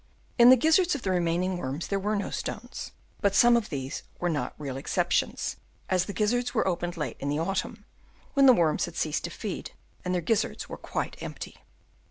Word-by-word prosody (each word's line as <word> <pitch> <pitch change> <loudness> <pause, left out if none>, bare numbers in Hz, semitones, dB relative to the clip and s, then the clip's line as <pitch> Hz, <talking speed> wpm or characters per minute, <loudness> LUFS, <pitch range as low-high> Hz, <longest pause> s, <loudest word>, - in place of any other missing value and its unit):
In 240 +1 +9
the 260 - +10
gizzards 320 +6 +3
of 280 - -6
the 190 - 0
remaining 180 +1 +1
worms 140 +2 -4
there 200 - 0
were 210 +2 0
no 200 - -2
stones; - - -5 0.3
but 200 -2 +1
some 240 +3 +7
of 230 -2 0
these 135 -1 -4 0.2
were 175 - 0
not 150 -3 -2
real 140 -3 -5
exceptions, 135 - 0 0.3
as 185 -1 +3
the - - -5
gizzards 240 +4 0
were - - +2
opened 175 -1 -2
late 150 - -3
in 140 - -3
the 145 - 0
autumn, 190 +5 -2 0.5
when 275 -1 +6
the 255 - +9
worms 165 -8 +2
had - - -9
ceased - - -1
to - - -3
feed - - -6 0.3
and 180 - -2
their 175 - 0
gizzards 220 +4 0
were - - -6
quite - - -4
empty. - - -7
185 Hz, 205 wpm, -28 LUFS, 165-230 Hz, 0.5 s, the